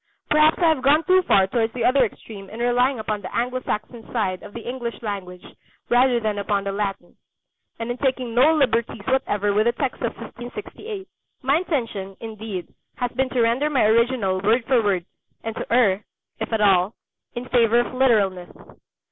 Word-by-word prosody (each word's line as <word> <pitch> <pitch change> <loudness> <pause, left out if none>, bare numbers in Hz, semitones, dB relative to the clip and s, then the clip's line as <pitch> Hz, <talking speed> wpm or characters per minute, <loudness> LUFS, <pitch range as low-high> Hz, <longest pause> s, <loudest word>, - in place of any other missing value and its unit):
Perhaps 305 +1 +5
I 345 - +3
have 310 -5 +1
gone 290 +4 +4
too 370 +1 +4
far 195 - +4
towards 225 +3 -1
the 250 - -1
other 260 +1 +4
extreme 205 -3 -7
in 220 - -9
relying 245 +2 +2
upon 215 -1 -3
the 185 - -7
Anglo 250 +2 -1
Saxon 225 +1 -4
side 190 -6 -1
of 210 - -11
the 235 - -8
English 240 -2 -4
language 185 -4 -5 0.4
rather 245 0 +4
than 215 -2 -2
upon 200 0 0
the 200 - -2
Latin, 195 -3 -4 0.6
and 230 +1 -3
in 245 - -5
taking 255 -3 -1
no 255 +7 +5
liberties 235 -8 0
whatever 205 -6 +1
with 215 +3 +2
the 235 - +3
text 260 +1 -3
of 235 - -2
1568. 315 - -8 0.4
My 275 +3 +3
intention, 230 - -3
indeed, 215 -5 -6 0.3
has 245 -1 -2
been 260 +1 -1
to 250 -1 0
render 240 +6 +2
my 275 -4 +2
original 220 -4 +2
word 225 +4 +2
for 255 -2 +3
word, 195 -5 0 0.4
and 225 -1 -4
to - - -6
err, 210 -5 +3 0.4
if - - -4
at 220 -1 0
all, 195 0 +3 0.4
in 240 +1 -5
favour 235 -1 +4
of 240 - -5
literalness. 205 -9 +2
235 Hz, 185 wpm, -23 LUFS, 205-255 Hz, 0.6 s, Perhaps